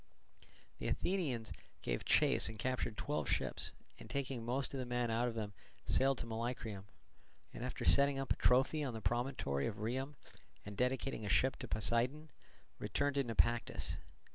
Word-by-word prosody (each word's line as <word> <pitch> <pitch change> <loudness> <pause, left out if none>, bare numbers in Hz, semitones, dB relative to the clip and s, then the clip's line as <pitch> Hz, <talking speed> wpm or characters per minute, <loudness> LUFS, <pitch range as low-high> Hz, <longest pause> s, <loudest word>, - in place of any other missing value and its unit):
The - - -2
Athenians 140 - 0 0.3
gave - - -1
chase - - +4
and 110 - -7
captured 125 -2 -1
twelve 150 +1 -1
ships, - - -1 0.3
and - - -11
taking 135 -4 -2
most 130 +4 -1
of 135 - -2
the 130 - -2
men 120 -1 0
out 120 +2 +2
of 115 - -3
them 105 -2 -3 0.3
sailed 135 0 +3
to - - -3
Molycrium, 115 -3 -3 0.7
and - - -6
after - - -3
setting 140 0 +6
up 135 0 +1
a - - -7
trophy 135 +5 +3
on 130 -5 -2
the 110 - -5
promontory 120 - 0
of 110 - -3
Rhium 130 +7 -2 0.5
and 100 0 -6
dedicating 125 +1 0
a 105 - -3
ship 130 +5 +4
to 125 - -6
Poseidon, 120 +9 +1 0.5
returned 140 +8 0
to 140 0 +2
Naupactus. 120 0 +1
125 Hz, 165 wpm, -37 LUFS, 115-135 Hz, 0.7 s, setting